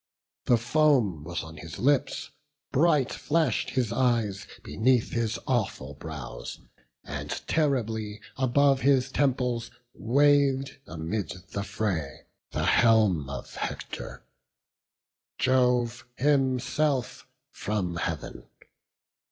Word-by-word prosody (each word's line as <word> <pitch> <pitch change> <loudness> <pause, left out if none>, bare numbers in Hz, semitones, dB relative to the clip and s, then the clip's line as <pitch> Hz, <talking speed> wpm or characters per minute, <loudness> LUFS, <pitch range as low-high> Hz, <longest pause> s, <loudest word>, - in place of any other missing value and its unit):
The 120 - +5
foam 120 - +2
was 85 +2 -4
on 80 0 -10
his 80 0 -8
lips; 140 +1 +1 0.4
bright 145 -2 +3
flash'd 155 -6 0
his 125 -4 0
eyes 115 -6 +1 0.2
Beneath 120 +2 +2
his 115 -1 -1
awful 100 - -1
brows, 75 -2 -7 0.4
and - - -6 0.2
terribly 115 -8 0 0.2
Above 135 +1 +3
his 135 -1 +3
temples 125 -4 0 0.2
wav'd 140 +1 +2
amid 85 +6 -3 0.2
the 100 - -2
fray 95 -9 -3 0.3
The 75 +2 -2
helm 100 - +4
of 70 -3 -7
Hector; - - -6 1.1
Jove 125 -2 +2
himself 135 0 +1 0.2
from 95 -5 -2
Heav'n. - - -4
120 Hz, 95 wpm, -27 LUFS, 100-135 Hz, 1.1 s, The